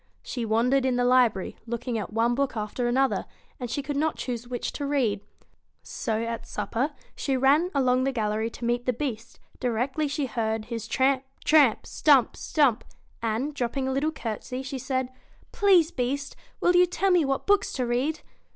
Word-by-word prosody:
She 240 -2 -4
wandered 240 +5 +2
in 260 -1 +1
the 245 0 +1
library, 245 -6 +3
looking 235 +1 -3
at 210 -4 -3
one 230 +2 +2
book 270 -2 -1
after 215 +3 -2
another, 265 +2 +1 0.3
and 245 -2 -4
she 280 +4 -2
could 285 +1 -3
not 310 +2 +1
choose 240 -1 -4
which 245 -1 -3
to 285 - -4
read. 240 -8 +1 0.6
So 225 -2 -2
at 230 0 -4
supper 265 +6 -2 0.2
she 270 -2 -1
ran 285 +7 +4
along 255 -2 +3
the 270 - +1
gallery 220 -2 -1
to 235 - -7
meet 240 +1 -1
the 250 - +3
Beast 235 -3 -5 0.2
directly 255 +6 -1
she 285 0 -1
heard 220 -2 -2
his 230 -2 -5
tramp, 265 0 +2 0.2
tramp! 290 -8 +5
stump, 280 -5 +3
stump! 275 -8 +2 0.4
and, 230 +6 -1
dropping 260 0 -2
a - - 0
little 280 +4 0
courtesy, 250 -1 -5
she 265 0 -5
said: 260 0 -2 0.4
'Please, 365 -5 +4
Beast! 275 +2 -2 0.3
will 355 - +4
you 360 0 +6
tell 380 +2 +1
me 355 -3 +4
what 270 -1 -1
books 405 -1 +3
to 255 - -1
read 255 +6 -1
255 Hz, 180 wpm, -26 LUFS, 235-280 Hz, 0.6 s, you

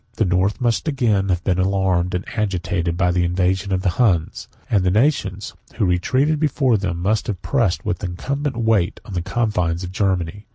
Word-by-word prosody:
The 110 - +1
North 95 +4 +1
must 120 +4 0
again 115 -9 +1
have 90 -1 0
been 95 -1 0
alarmed, 95 -2 +1
and 90 - -3
agitated, 90 -5 -1
by 90 -1 +2
the 90 0 +1
invasion 95 +2 0
of 95 -1 0
the - - +2
Huns; 90 -9 +1 0.2
6411 - - +2
and 95 - +3
the 95 +3 +3
nations 105 - 0 0.2
who - - +1
retreated 130 - +1
before 135 -6 +2
them 95 -4 -2
must 105 +2 0
have 100 -6 -3
pressed 95 - 0
with 90 - -2
incumbent 135 +9 -3
weight 110 -5 +1
on 105 - -9
the 90 - -1
confines 90 -5 -1
of 90 - -5
Germany. 95 0 -1
95 Hz, 195 wpm, -21 LUFS, 90-110 Hz, 0.2 s, and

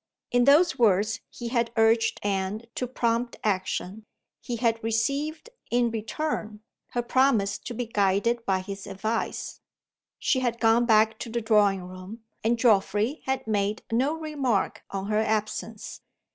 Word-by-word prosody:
In 245 0 +3
those 300 +4 +5
words 210 -1 +3
he 240 -1 -6
had 235 -1 0
urged 225 0 +3
Anne 200 +2 -1
to 250 - -3
prompt 235 -1 -1
action. 200 +1 -2 0.3
He 240 - -4
had 230 -1 0
received, 280 - -1 0.2
in 240 -1 +2
return, 220 -1 -3 0.3
her 240 - 0
promise 235 -6 +2
to 240 - -7
be 245 - -2
guided 210 +2 +1
by 190 -3 0
his 195 +1 -7
advice. 215 +4 -3 0.6
She 260 - +1
had 240 -2 -1
gone 230 +1 +4
back 220 -1 +4
to - - -5
the 235 +1 -1
drawing 210 -4 +3
room; 185 +5 -10 0.2
and 235 +2 +2
Geoffrey 220 +3 +2
had 265 0 -1
made 210 -1 -1
no 265 +7 +1
remark 280 -10 -1
on 195 0 -4
her 210 +1 +1
absence. 215 0 -3
225 Hz, 145 wpm, -26 LUFS, 210-240 Hz, 0.6 s, those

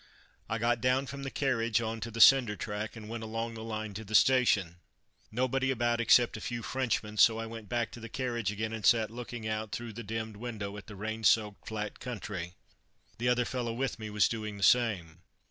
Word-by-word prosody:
I 115 - 0
got 115 +1 +1
down 125 +2 +2
from 140 +1 -7
the 135 - -4
carriage 115 -5 +1
on 115 0 -3
to 115 - -5
the 115 0 -7
cinder 125 -4 +7
track, 105 +1 -4
and 110 -2 -9
went 115 +1 -5
along 115 +1 -3
the 110 -1 -7
line 110 -2 -4
to 110 +3 -6
the 110 +1 -4
station. 105 -9 +4 0.5
Nobody 130 +3 0
about 120 -2 +1
except 120 +1 +5
a 110 - -7
few 120 0 -4
Frenchmen, 115 -5 -2
so 110 +1 +6
I 115 - -3
went 115 -2 -9
back 120 -2 -1
to - - -9
the 115 0 -8
carriage 120 -4 -2
again, 110 +2 -3
and 110 -2 -5
sat 110 -1 +4
looking 120 -1 -6
out 110 -1 -3
through 120 -1 -5
the 120 - -6
dimmed 110 0 -5
window 105 -3 -5
at 105 - -10
the 105 - -9
rain 110 +3 -4
soaked 105 -2 +2
flat 105 -1 -4
country. 100 -7 -5 0.6
The 120 +1 +1
other 125 0 +2
fellow 120 -2 -2
with 125 -1 -2
me 110 -1 -5
was 105 -1 +3
doing 110 -3 -4
the 100 - -5
same. 95 -9 +2
115 Hz, 215 wpm, -31 LUFS, 105-120 Hz, 0.6 s, cinder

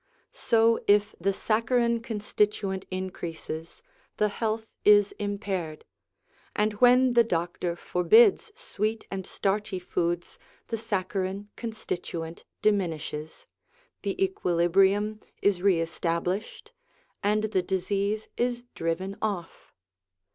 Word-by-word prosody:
So, 230 0 +3
if 205 +1 +4
the 195 +3 +2
saccharine 235 +3 +1
constituent 210 -3 -1
increases, 175 - -6 0.3
the 210 - +2
health 220 +1 -2 0.2
is 205 -1 +6
impaired; 200 -6 -3 0.7
and 210 0 +1
when 250 0 +6
the 235 -1 +6
doctor 175 -3 -2
forbids 435 - +4
sweet 220 - -3
and 190 -1 -4
starchy 205 0 -1
foods 175 -1 -2 0.3
the 230 - -1
saccharine 200 -2 -2
constituent 175 -7 -5 0.2
diminishes, 160 -6 -1 0.6
the - - -3
equilibrium 195 - +2 0.2
is 200 -3 +2
re 190 -3 +4
established, 170 - -2 0.5
and 210 +1 +2
the 190 - +3
disease 200 +3 -1
is 240 0 0
driven 185 +4 -2
off. 195 -6 -4
200 Hz, 100 wpm, -27 LUFS, 180-220 Hz, 0.7 s, is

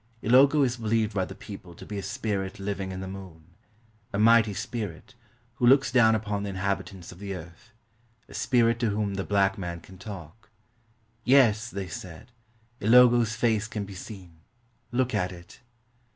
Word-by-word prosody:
Ilogo 140 +5 +5
is 125 -1 -2
believed 110 -1 0
by 95 -2 0
the - - -10
people 90 -4 -10
to - - -11
be 105 -1 -5
a - - -3
spirit 100 -1 -3
living 95 -1 -3
in 95 0 -6
the 95 - -5
moon 90 -4 -10 0.3
— 110 -2 -35
a - - -1
mighty 110 -1 +5
spirit, 110 -6 -5 0.4
who 125 -3 +2
looks 135 +2 +5
down 115 -3 +5
upon 105 -2 -2
the 100 - -4
inhabitants 95 -1 -3
of 90 - -13
the 100 -1 -5
earth 85 +6 -12 0.3
— 115 -1 -38
a - - -14
spirit 115 -2 +2
to 115 -3 +1
whom 105 -1 -1
the 95 -1 -2
black 100 -1 +1
man 85 -2 -5
can 95 +2 -15
talk. 100 0 -10 0.7
"Yes," 115 -4 +4
they 100 -3 -5
said, 90 +5 -9 0.5
"Ilogo's 120 0 +5
face 110 -1 +1
can 105 -2 -4
be 100 - -10
seen; 95 -4 -10 0.5
look 125 +1 0
at 90 +1 0
it." 85 -1 -13
105 Hz, 180 wpm, -27 LUFS, 95-115 Hz, 0.7 s, Ilogo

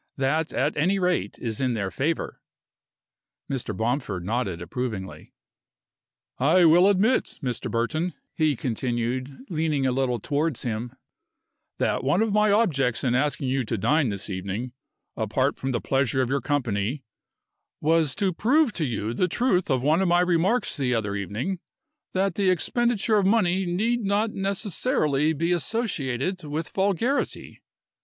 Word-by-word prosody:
That, 145 +4 0
at 145 +3 0
any 180 +6 +2
rate, 180 -1 0
is 115 0 -4
in 125 -2 +1
their 100 -3 -2
favor." 155 +4 -2 1.1
Mr. 120 -7 -4
Bomford 110 -6 -1
nodded 100 -5 -1
approvingly. 95 +1 -5 1.1
"I 165 +7 +5
will 175 +4 +6
admit, 205 +6 +2
Mr. 125 -2 -2
Burton," 155 +9 -1 0.2
he 155 -3 +2
continued, 125 - -3
leaning 155 -4 0
a 130 - +2
little 125 -2 0
towards 145 +4 -1
him, 120 +1 -3 0.8
"that - - 0
one 145 +11 +2
of 220 -2 -1
my 210 0 +4
objects 140 - +2
in 125 -3 +1
asking 135 0 0
you 130 0 +1
to 115 0 -2
dine 145 +6 +2
this 100 -1 -4
evening, 100 +6 -4 0.4
apart 130 +6 0
from 135 - -3
the 120 -3 0
pleasure 135 -1 +1
of 125 - -3
your 140 0 +1
company, 125 -2 -1 0.8
was 160 -3 +2
to 195 -2 0
prove 250 - +3
to 160 - -1
you 115 -3 -2
the 180 - +1
truth 190 -3 +1
of 130 -2 +1
one 155 +5 +3
of 190 - +2
my 175 +1 +4
remarks 180 +7 +1
the 125 -3 0
other 105 -3 -1
evening 110 - -3 0.5
that 190 0 +1
the 195 +1 +1
expenditure 220 +4 +1
of 200 - +2
money 190 -3 +2
need 225 +7 0
not 205 +2 +1
necessarily 195 - 0
be 165 +3 -1
associated 180 - -1
with 155 +2 -4
vulgarity. 200 +8 -1
145 Hz, 150 wpm, -25 LUFS, 125-185 Hz, 1.1 s, will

